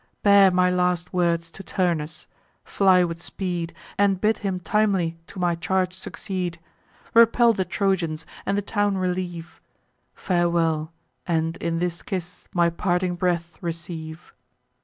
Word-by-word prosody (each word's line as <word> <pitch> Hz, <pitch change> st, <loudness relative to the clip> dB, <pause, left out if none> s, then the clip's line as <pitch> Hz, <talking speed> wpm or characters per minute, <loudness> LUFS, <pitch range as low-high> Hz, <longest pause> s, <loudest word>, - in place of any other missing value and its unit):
Bear 200 Hz, -1 st, +7 dB
my 180 Hz, 0 st, +3 dB
last 180 Hz, -1 st, 0 dB
words 170 Hz, -2 st, +1 dB
to 195 Hz, -, -10 dB
Turnus; 165 Hz, -5 st, -2 dB, 0.4 s
fly 190 Hz, -2 st, +4 dB
with 170 Hz, -1 st, -3 dB
speed, 175 Hz, -3 st, -3 dB, 0.3 s
And 200 Hz, -2 st, +3 dB
bid 215 Hz, +2 st, +2 dB
him 190 Hz, -3 st, -2 dB
timely 190 Hz, -4 st, +1 dB
to -, -, -11 dB
my 175 Hz, -1 st, +1 dB
charge 180 Hz, +2 st, 0 dB
succeed, 185 Hz, -2 st, -4 dB, 0.5 s
Repel 230 Hz, +1 st, +6 dB
the 190 Hz, -3 st, -1 dB
Trojans, 170 Hz, -6 st, -1 dB, 0.2 s
and 200 Hz, -, 0 dB
the 205 Hz, -, -1 dB
town 205 Hz, -1 st, 0 dB
relieve: 180 Hz, -2 st, -3 dB, 0.5 s
Farewell! 170 Hz, -3 st, +1 dB, 0.4 s
and 165 Hz, -1 st, 0 dB
in 165 Hz, 0 st, -2 dB
this 175 Hz, 0 st, -2 dB
kiss 180 Hz, -2 st, -6 dB
my 170 Hz, -1 st, +2 dB
parting 180 Hz, +1 st, 0 dB
breath 175 Hz, -2 st, -1 dB
receive." 165 Hz, -1 st, -6 dB
180 Hz, 135 wpm, -24 LUFS, 170-190 Hz, 0.5 s, Bear